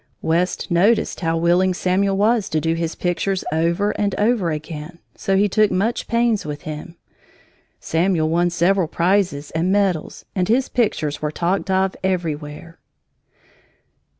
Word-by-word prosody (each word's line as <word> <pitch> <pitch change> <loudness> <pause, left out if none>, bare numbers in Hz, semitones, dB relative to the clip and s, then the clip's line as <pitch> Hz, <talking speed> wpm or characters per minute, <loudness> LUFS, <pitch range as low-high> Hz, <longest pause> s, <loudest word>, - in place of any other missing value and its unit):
West 175 +3 0
noticed 200 +7 +2
how 165 -2 0
willing 175 +2 +2
Samuel 195 +2 +1
was 215 0 +2
to 160 - 0
do 165 +1 0
his 165 0 -3
pictures 185 +2 -1
over 170 +6 +1
and 200 -2 -1
over 210 -4 +1
again, 155 +2 -6 0.2
so 195 0 0
he 205 +1 +4
took 215 +1 +3
much 210 +6 -1
pains 235 -2 +1
with 150 -1 -6
him. 155 +2 -7 0.8
Samuel 165 -1 +1
won 170 +2 +2
several 175 +1 +2
prizes 170 -4 0
and 165 +3 0
medals, 195 -5 0
and 180 -2 0
his 255 +3 +2
pictures 155 -11 -1
were 150 - -1
talked 180 +6 -1
of 190 0 +1
everywhere. 165 -3 -3
180 Hz, 145 wpm, -21 LUFS, 165-195 Hz, 0.8 s, he